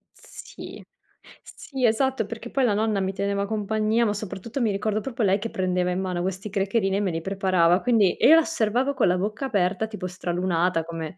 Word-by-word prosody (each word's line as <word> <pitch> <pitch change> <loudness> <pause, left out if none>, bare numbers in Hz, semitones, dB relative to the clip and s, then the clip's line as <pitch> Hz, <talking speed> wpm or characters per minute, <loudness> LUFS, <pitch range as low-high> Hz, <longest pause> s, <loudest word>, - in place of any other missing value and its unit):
Sì, - - -11 0.6
sì, 265 -3 -4
esatto, 245 +1 +1
perché 230 +2 -8
poi 270 -2 +1
la 210 - +2
nonna 215 -1 0
mi 190 0 -1
teneva 200 0 -1
compagnia, 220 +2 0
ma 205 - +1
soprattutto 215 +5 -5
mi 220 -3 +2
ricordo 215 +2 -1
proprio 245 -2 -3
lei 195 0 +3
che 230 +2 -4
prendeva 180 -1 -1
in 180 - -1
mano 180 -2 -2
questi 190 +3 -4
crackerini 195 0 0
e - - 0
me 195 -4 0
li 165 0 -3
preparava. 185 -2 +2
Quindi, 225 -7 +3
io 290 +8 +7
la 330 - +6
osservavo 260 -2 0
con - - +2
la 180 +1 +2
bocca 210 +8 -3
aperta, 200 -2 0
tipo 210 -4 -6
stralunata, 175 -1 -1
come 165 +1 -7
200 Hz, 200 wpm, -24 LUFS, 185-225 Hz, 0.6 s, io